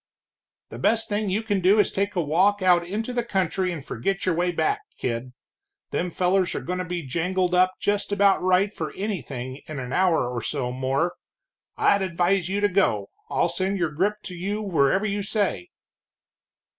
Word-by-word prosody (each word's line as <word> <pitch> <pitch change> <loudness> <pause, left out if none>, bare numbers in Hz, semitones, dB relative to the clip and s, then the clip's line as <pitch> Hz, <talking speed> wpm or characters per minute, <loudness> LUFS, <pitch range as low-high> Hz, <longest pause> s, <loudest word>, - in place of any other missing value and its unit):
"The - - -7
best 225 0 +2
thing 205 0 -1
you 205 +4 0
can 205 -3 0
do 190 +4 +5
is 205 - +4
to - - -15
take 200 +1 0
a 175 - +1
walk 190 +7 +2
out 175 -2 +5
into 215 +7 -3
the 245 - +1
country 190 -3 0
and 155 -5 -6
forget 180 +11 -2
your 185 - +2
way 175 +2 +1
back, 410 - 0 0.2
kid. 120 +1 -3 0.6
Them 180 - -1
fellers 180 +1 +1
are - - -1
goin' 180 +1 -3
to - - -1
be 175 -2 -4
jangled 180 +6 0
up 185 +1 +4
just 205 0 -1
about 200 -1 +4
right 185 +3 +2
for 155 -6 -4
anything 135 - -4
in 155 - -6
an 125 -1 -5
hour 180 -8 +3
or 120 -1 -3
so 130 -4 -2
more. 135 +7 0 0.6
I'd 200 - +3
advise 180 0 +1
you 200 +1 -1
to 205 - +4
go 180 - +1 0.2
I'll - - +2
send 185 +3 -1
your 170 -4 0
grip 205 +7 -1
to 185 - -7
you 195 +4 -3
wherever 185 +1 +2
you 205 -1 -1
say." 210 - -1
185 Hz, 195 wpm, -25 LUFS, 165-200 Hz, 0.6 s, do